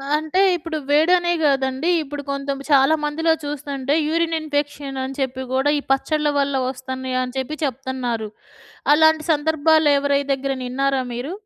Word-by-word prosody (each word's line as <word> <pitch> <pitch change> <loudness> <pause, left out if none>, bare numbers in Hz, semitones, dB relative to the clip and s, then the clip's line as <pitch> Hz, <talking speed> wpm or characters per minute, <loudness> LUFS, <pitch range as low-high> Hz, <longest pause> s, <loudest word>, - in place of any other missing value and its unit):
అంటే 315 +5 0
ఇప్పుడు 330 -1 -4
వేడనే 345 +4 +3
గాదండి. 270 +2 +1
ఇప్పుడు 290 0 -6
కొంచెం 275 0 -3
చాలామందిలో 300 +3 +3
చూస్తుంటే 285 -1 -3
యూరిన్ 330 0 0
ఇన్ఫెక్షన్ 290 -2 -3
అని 265 +1 -5
చెప్పి 260 0 -2
గూడా 270 +3 +2
ఈ - - -6
పచ్చళ్ల 300 +2 +1
వల్ల 280 0 0 0.2
ఒస్తున్నాయని 260 -1 -4
చెప్పి 295 +4 -3
చెప్తున్నారు. 250 -4 -3 0.6
అలాంటి 315 0 +4
సందర్భాలు 315 0 +3
ఎవరిదగ్గరైనా 280 -1 0
విన్నారా 275 +1 0
మీరు? 250 +7 -5
280 Hz, 125 wpm, -21 LUFS, 265-310 Hz, 0.6 s, అలాంటి